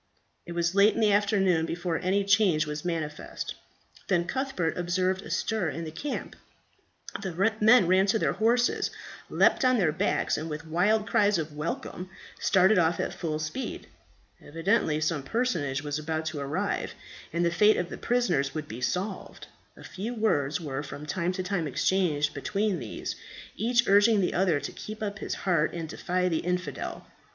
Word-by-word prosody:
It 170 - -5
was 170 0 0
late 200 +2 +5
in - - -1
the 215 -2 +4
afternoon 195 -5 +2
before 175 -1 -2
any 195 +2 +1
change 195 -6 +3
was 150 0 -5
manifest. 160 -4 -4 0.5
Then 175 -3 +2
Cuthbert 260 - -2
observed 185 +2 0
a - - -10
stir 185 +2 0
in 165 +3 -5
the 160 - -6
camp; 275 - -5 0.9
the 195 +3 0
men 220 -1 +7
ran 185 +3 +4
to 220 +3 +3
their - - +1
horses, 240 +2 +2 0.4
leapt - - +3
on 255 -1 +4
their 175 -7 +2
backs, - - 0
and 160 +2 -5
with 150 +1 -5
wild 200 +7 +2
cries 205 -3 +3
of 155 -2 -4
"Welcome!" 170 +3 -4 0.3
started 190 +1 +4
off 165 0 +2
at - - -2
full 155 -3 -3
speed. 155 +12 -5 0.6
Evidently 165 0 +1
some 155 -1 0
personage 145 - -1
was 145 0 -2
about 160 +1 -3
to 155 -2 -3
arrive, 140 0 -2 0.4
and 170 +1 0
the 170 - +2
fate 210 +5 +4
of 175 - -2
the - - -6
prisoners 175 - +1
would 155 -1 -4
be 115 +3 -7
solved. 190 +8 -3 0.3
A - - -12
few 220 +6 -5
words 150 -10 +1
were 145 -4 -4
from 145 0 -8
time 170 +3 -1
to 185 0 -3
time 180 -4 -1
exchanged 150 -1 +1
between 200 +5 -1
these, 115 -5 -5 0.4
each 235 +3 +2
urging 205 +2 +5
the 185 - +1
other 175 -5 +2
to - - -5
keep 215 +1 -7
up 205 0 -4
his - - -3
heart 170 -5 +2
and 165 -2 -4
defy 180 +3 -1
the 165 -3 0
infidel. 180 +1 -3
180 Hz, 175 wpm, -28 LUFS, 155-205 Hz, 0.9 s, men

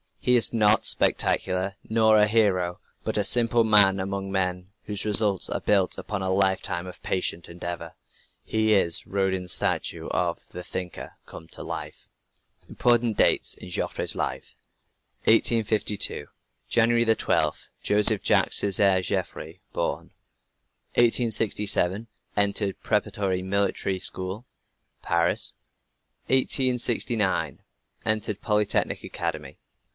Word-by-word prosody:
He 125 - +1
is 120 - +3
not 110 -1 +3
spectacular, 95 +1 +1
nor 110 -1 +4
a 105 - +4
"hero," 95 -5 +1 0.2
but - - -3
a 105 - +2
simple 115 +2 +3
man 100 -3 +4
among 95 0 -4
men, 90 -1 -2
whose 105 0 -4
results 105 -2 +3
are - - -2
built 100 -3 +1
upon 100 -2 -5
a 95 - -2
lifetime 95 -2 0
of 90 - -11
patient 90 -2 -3
endeavor. 85 -1 -7 0.5
He 110 0 +1
is 85 -5 +3
Rodin's 95 -2 -2
statue - - +1
of - - -1
"The 90 - -9
Thinker" 90 -1 -6
come 80 - -11
to - - -6
life. - - -8 0.6
IMPORTANT 120 -2 +1
DATES - - +2
IN 90 - -10
JOFFRE'S 90 - -3
LIFE - - -4 0.7
1852. 110 -8 +1 0.4
January 120 0 +2
12. 110 -1 0
Joseph 105 0 +3
Jacques - - +3
Césaire 95 -1 +2
Joffre 85 0 -4
born. 85 - -3 0.8
1867. 110 -4 +2 0.3
Entered 100 -1 +1
preparatory 100 -3 -1
military 100 0 -1
school, 95 +6 -3 0.6
Paris. 85 0 +1 0.7
1869. 120 - 0 0.4
Entered 110 -1 0
Polytechnic 105 -2 0
Academy. - - -5
100 Hz, 110 wpm, -25 LUFS, 95-110 Hz, 0.8 s, nor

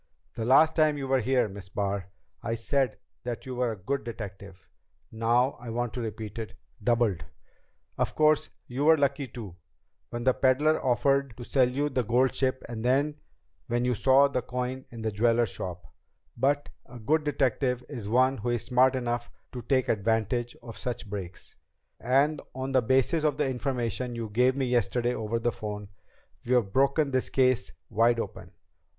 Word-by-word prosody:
"The 115 - -4
last 155 +6 +5
time 155 -2 +3
you 135 -1 -4
were 135 0 +3
here, 125 0 +2
Miss 95 -2 -10
Barr, 100 -2 -2 0.3
I 115 - -2
said 130 +3 0 0.3
that 120 -1 -5
you 130 - -5
were 125 -1 0
a - - -9
good 135 +9 -2
detective. 100 -5 -8 0.4
Now 120 +4 +2
I 120 -1 -8
want 120 0 -2
to 125 - -4
repeat 110 -1 -5
it 110 - -6 0.3
doubled. 115 -7 +2 0.8
Of - - 0
course 155 0 +3 0.2
you 130 +4 -2
were 160 0 +7
lucky, 140 -1 0
too, 105 -9 -9 0.5
when 120 0 -4
the 130 0 +4
peddler 145 +5 +2
offered 135 0 +1
to 120 - -7
sell 125 0 +3
you 140 +3 0
the 130 -3 0
gold 125 +4 +2
ship 130 -1 -1
and 115 -1 -6 0.8
when 120 0 0
you 125 - +2
saw 135 +4 +5
the 135 -3 -1
coin 125 +1 -4
in 115 -2 -8
the 110 - 0
jeweler's 115 +1 +2
shop. 90 -1 -6 0.5
But 145 +1 +1 0.2
a 125 - -11
good 150 +8 +1
detective 130 -3 0
is 115 -8 -6
one 130 +3 +3
who 120 - -2
is 120 -2 -1
smart 125 +2 +4
enough 120 -1 -2 0.2
to 125 - -6
take 130 +2 +1
advantage 115 +3 0
of 115 -3 -8
such 115 -3 -4
breaks. 95 -4 -7 0.4
And 140 +5 +2
on 130 +1 -3
the 130 -1 +4
basis 130 +6 +2
of 150 -2 +1
the 150 -2 +1
information 125 -2 -2
you 115 -2 -4
gave 125 +4 +3
me 135 -1 0
yesterday 120 0 +1
over 110 -1 -2
the 120 +1 0
phone, 105 -1 -6 0.5
we've 120 -5 +1
broken 140 +2 +3
this 130 -1 0
case 130 -6 +2 0.2
wide 115 +2 +3
open. - - -6
125 Hz, 175 wpm, -28 LUFS, 115-135 Hz, 0.8 s, were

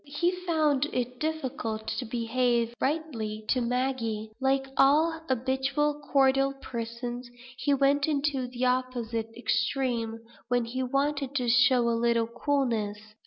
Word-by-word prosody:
He 320 +5 +1
found 315 -6 +1
it 250 0 -3
difficult 260 -8 -3
to 255 - -3
behave 235 0 0
rightly 235 -8 -2
to 255 - +2
Maggie. 235 -3 -1
Like 270 0 +2
all 315 +4 +4
habitually 265 +4 0
cordial 270 0 +4
persons, 240 -1 -5 0.3
he 285 +1 +2
went 280 +2 +3
into 280 -3 0
the 245 0 -2
opposite 245 -3 -1
extreme, 240 -3 0 0.3
when 245 -1 +1
he 250 +3 -3
wanted 275 +1 -1
to 250 -3 0
show 250 0 +5
a - - +3
little 230 0 +2
coolness. 235 -4 -1
255 Hz, 125 wpm, -28 LUFS, 235-280 Hz, 0.3 s, show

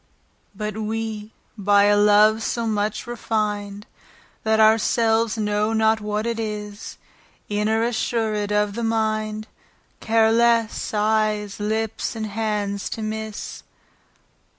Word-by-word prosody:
But 210 0 -4
we 220 0 -4 0.2
by 200 -1 +4
a 205 0 +5
love, 210 +1 +5
so 235 +1 -2
much 215 -1 -1
refin'd, 210 -3 -3 0.6
That 220 0 +2
our 220 +1 +6
selves 225 0 +1
know 210 0 0
not 220 0 +2
what 210 +1 -2
it 235 -1 -2
is, 210 -1 -5 0.5
Inter 215 +2 +1
assured 220 -3 -1
of 210 -1 +1
the 235 +2 -4
mind, 215 -1 -1 0.5
Care 225 0 +3
lesse, 230 -1 +2
eyes, 210 -1 0
lips, 220 +2 -2
and 220 -1 -3
hands 205 -2 -2
to 220 - -5
misse. 220 0 -5
215 Hz, 120 wpm, -22 LUFS, 210-225 Hz, 0.6 s, our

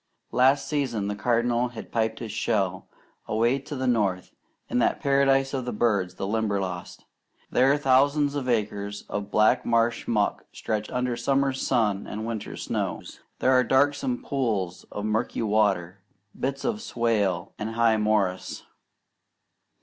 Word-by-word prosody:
Last 135 +3 +3
season 130 -9 -1
the 105 - -2
Cardinal 120 +2 +1
had 120 -2 -10
pipped 110 -1 0
his 115 -3 -6
shell, 100 -4 -1 0.4
away 115 +5 +2
to 145 +2 -7
the 130 -1 -2
north, 100 -7 0 0.4
in - - 0
that 120 - +2
paradise 135 -1 +2
of 130 -2 -1
the 125 - -2
birds, 105 -5 0
the - - -4
Limberlost. 100 -4 -2 0.5
There 135 +3 +4
thousands 140 +1 +3
of 135 -3 -3
acres 105 -3 -1
of 100 0 -4
black 105 +1 +3
marsh 115 0 +1
muck 105 -3 0
stretch 110 -1 -3
under 125 -1 -1
summers' 135 +2 0
sun 105 -6 +1
and 110 +1 -5
winters' 115 -2 -5
snows. - - -4 0.2
There 130 - +2
are 130 -1 +5
darksome 135 0 +1
pools 105 -10 -2
of 105 - -4
murky 110 +2 -1
water, 100 -4 +1 0.3
bits 135 +1 -3
of 220 -2 -1
swale, 105 - 0
and 110 +1 -4
high 115 -1 +3
morass. 105 -4 0
115 Hz, 145 wpm, -26 LUFS, 105-130 Hz, 0.5 s, are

